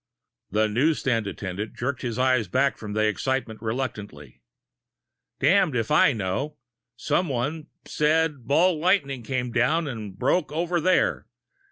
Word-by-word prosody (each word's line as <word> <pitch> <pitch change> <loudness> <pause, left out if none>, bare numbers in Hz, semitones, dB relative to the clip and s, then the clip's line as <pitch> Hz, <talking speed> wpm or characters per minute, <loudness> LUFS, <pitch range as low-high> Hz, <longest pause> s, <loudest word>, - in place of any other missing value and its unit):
The 110 +2 +2
newsstand 120 -1 +1
attendant 100 +2 -5
jerked 130 +1 -3
his 120 -2 -3
eyes 130 -4 +2
back 135 +8 +1
from 105 -2 -6
they 110 0 +2
excitement 110 +1 -2
reluctantly. 105 - -5 1.0
"Damned 165 0 +3
if 115 +1 -1
I 150 -1 +5
know. 120 +7 -3 0.4
Someone, 150 +2 -1 0.2
says 160 +2 +2
a 145 - -18
ball 155 +7 +2
lightning 155 -7 +1
came 125 0 -3
down 155 +7 +1
and 105 -7 -6
broke 145 - +1
over 170 +2 -1
there. 185 +3 +1
130 Hz, 135 wpm, -25 LUFS, 110-150 Hz, 1.0 s, I